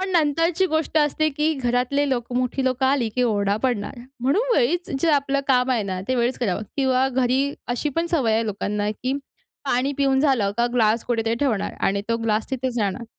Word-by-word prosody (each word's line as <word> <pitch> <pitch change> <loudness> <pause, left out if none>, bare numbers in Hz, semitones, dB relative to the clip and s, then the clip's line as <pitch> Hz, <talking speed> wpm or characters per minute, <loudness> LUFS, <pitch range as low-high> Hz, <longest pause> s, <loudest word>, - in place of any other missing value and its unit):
पण 380 0 -2
नंतरची 330 +3 +2
गोष्ट 315 -1 -1
असते, 300 +1 +2
की 300 +3 0
घरातले 255 +2 0
लोक 240 -1 -2
मोठी 255 +2 -1
लोकं 260 0 +1
आली 265 -4 +2
की 250 - +2
ओरडा 205 -3 +1
पडणार. 245 -1 -1 0.2
म्हणून 420 - +1
वेळीच 345 +9 +1
जे 330 - +3
आपलं 280 -1 +1
काम 250 0 +3
आहे 240 -4 +1
ना, 190 -2 -4
ते 260 - +1
वेळीच 245 +1 0
करावं 210 -3 -1
किंवा 265 -1 +2
घरी 260 +2 +1 0.2
अशीपण 295 +7 -1
सवय 265 -10 +2
आहे, 225 +1 +1
लोकांना, 205 0 -2
की 255 +5 -3 0.5
पाणी 270 +1 0
पिऊन 270 -1 +3
झालं 260 -9 +2
का, 240 0 +2
ग्लास 225 -1 +2
कुठेतरी 230 -2 0
ठेवणार 240 -8 0 0.2
आणि 200 +1 0
तो 230 - +1
ग्लास 220 +1 -1
तिथेच 255 -2 -2
राहणार. 210 +3 -1
255 Hz, 190 wpm, -23 LUFS, 230-280 Hz, 0.5 s, जे